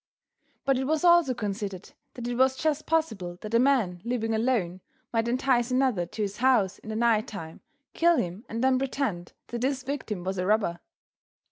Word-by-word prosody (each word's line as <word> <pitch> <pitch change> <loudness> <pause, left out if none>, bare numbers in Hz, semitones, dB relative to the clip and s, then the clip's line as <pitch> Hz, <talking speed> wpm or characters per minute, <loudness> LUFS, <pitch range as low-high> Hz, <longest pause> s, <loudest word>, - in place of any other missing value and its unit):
But 270 -2 +2
it 265 - -1
was 315 +2 0
also 345 -7 +5
considered 200 -4 -4 0.2
that 240 -1 -5
it 245 - -2
was 260 +1 +3
just 310 +1 -1
possible 220 - -1
that 215 +1 -7
a 230 - +5
man 235 -10 +2
living 230 -2 -1
alone 220 -6 0 0.3
might 225 0 +1
entice 245 0 +1
another 255 -9 +1
to 215 +4 -4
his 200 0 -4
house 240 -7 +2
in - - -11
the 215 - -3
night 230 0 +2
time, 165 -6 -8 0.3
kill 340 0 +4
him 180 +5 -3
and 230 +2 -3
then 260 -1 +3
pretend 260 -10 -2 0.2
that 240 -1 -4
his 265 0 0
victim 255 -9 -4
was 190 0 -3
a 180 - -1
robber. 200 -5 +1
235 Hz, 190 wpm, -27 LUFS, 200-265 Hz, 0.3 s, also